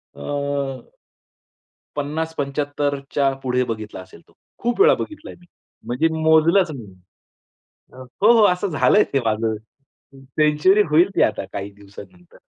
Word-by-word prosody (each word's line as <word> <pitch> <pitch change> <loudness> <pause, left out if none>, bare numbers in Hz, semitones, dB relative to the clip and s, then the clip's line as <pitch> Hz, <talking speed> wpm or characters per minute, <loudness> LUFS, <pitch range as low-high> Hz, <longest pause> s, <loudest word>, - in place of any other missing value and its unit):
अ 70 - -10 1.7
50 160 +3 -3
75 145 0 -2 0.2
च्या 140 -1 +2
पुढे 125 -1 0
बघितला 110 -4 -6
असेल 95 - -15
तो, - - -24 0.3
खूप 240 +8 -2
वेळा 430 - +7
बघितला 310 0 -7
मी. 175 - -21 0.4
म्हणजे 125 +7 +1
मोजलच 160 +3 +4
नाही 130 -8 -8
मी. 95 -2 -18 0.9
अ, - - -15 0.3
हो, 220 +3 +7
हो. - - +6
असं 180 +2 0
झालंय 195 +5 +3
ते 135 - +2
माझं 110 0 0 0.6
हं, 135 0 -16
सेंच्युरी 150 +8 +3
होईल 170 +5 +5
ती - - +4
आता - - 0
काही 100 +1 -5
दिवसानंतर, 100 -3 -15
145 Hz, 145 wpm, -21 LUFS, 115-165 Hz, 1.7 s, वेळा